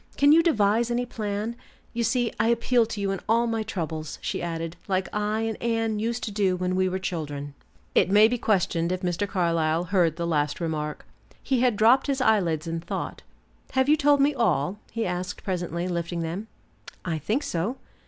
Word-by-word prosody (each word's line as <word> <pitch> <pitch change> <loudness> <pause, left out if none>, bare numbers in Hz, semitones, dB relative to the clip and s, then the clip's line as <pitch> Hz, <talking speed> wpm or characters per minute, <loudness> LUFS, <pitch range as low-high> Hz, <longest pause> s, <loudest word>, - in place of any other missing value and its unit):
Can 285 +1 +6
you 325 +2 +7
devise 230 - +2
any 240 +1 0
plan? 215 -1 -3 0.4
You 235 0 -1
see 240 +1 +1
I 225 - +3
appeal 235 0 +3
to 220 - -5
you 200 -1 0
in 195 - -2
all 230 +1 +4
my 225 -1 -1
troubles," 160 -8 -4
she - - -3
added, 165 -1 -4
"like 190 -1 0
I 210 +1 0
and 225 -1 -3
Anne 225 -2 0
used 235 +2 -2
to 215 - -3
do 200 -3 +1
when 180 0 -1
we 185 0 +2
were 185 - -2
children." 145 -6 -4 0.4
It - - +4
may 210 +2 +7
be 245 +1 -1
questioned 175 -5 +1
if 185 +1 -3
Mr. 180 +3 0
Carlyle 165 -3 +1
heard 175 -3 +2
the 170 0 -3
last 150 -2 0
remark. 155 -3 -3 0.4
He 265 -2 +1
had 245 -2 +3
dropped 235 +7 +4
his 275 -1 0
eyelids 185 -10 +2
in 165 0 -3
thought. 165 - -5 0.5
"Have 260 0 +2
you 300 - +6
told 290 -1 +4
me 290 +2 +4
all?" 200 - 0
he 230 0 -2
asked 180 0 -4
presently, 175 -2 -2
lifting 170 -1 -2
them. 175 +7 -4 0.6
"I 165 -3 -1
think 220 - -1
so." 190 +10 -2
200 Hz, 195 wpm, -26 LUFS, 170-230 Hz, 0.6 s, you